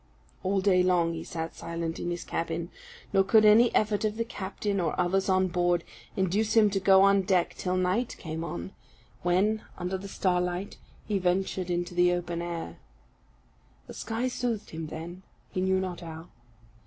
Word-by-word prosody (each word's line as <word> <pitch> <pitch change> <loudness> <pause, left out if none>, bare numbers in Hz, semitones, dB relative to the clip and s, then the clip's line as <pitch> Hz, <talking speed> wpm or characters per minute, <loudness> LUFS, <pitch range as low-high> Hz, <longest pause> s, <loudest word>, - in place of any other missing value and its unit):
All 195 +1 +1
day 185 -2 +4
long 175 -2 +2
he 165 0 -5
sat 165 -2 -5
silent 165 -1 -4
in 175 - -3
his 175 -1 -3
cabin; 165 +1 -3 0.4
nor 195 -1 +5
could 215 +2 +5
any 225 +3 +7
effort 215 -1 +2
of 215 0 -1
the 230 - -1
captain, 200 -1 -3
or 165 -4 -1
others 190 +2 +1
on 185 0 +3
board, 175 -1 +1 0.3
induce 200 +4 +1
him 210 -2 +6
to 195 - 0
go 190 0 +6
on 200 0 +5
deck 185 -2 +1
till 185 0 -2
night 185 +7 0
came 160 0 -5
on, 95 - -5 0.5
when, 195 +5 +2 0.2
under 180 +1 -3
the 200 - -8
starlight, 180 0 -1 0.3
he 205 -2 0
ventured 185 0 0
into 175 0 -2
the 175 0 +4
open 175 -1 -3
air. 165 - -5 1.1
The - - -10
sky 225 +3 -2
soothed 240 -4 -3
him 160 -1 -5
then, 170 +4 -7 0.3
he 185 - -2
knew 190 0 +2
not 185 -2 -4
how. 165 0 -9
185 Hz, 175 wpm, -28 LUFS, 175-200 Hz, 1.1 s, any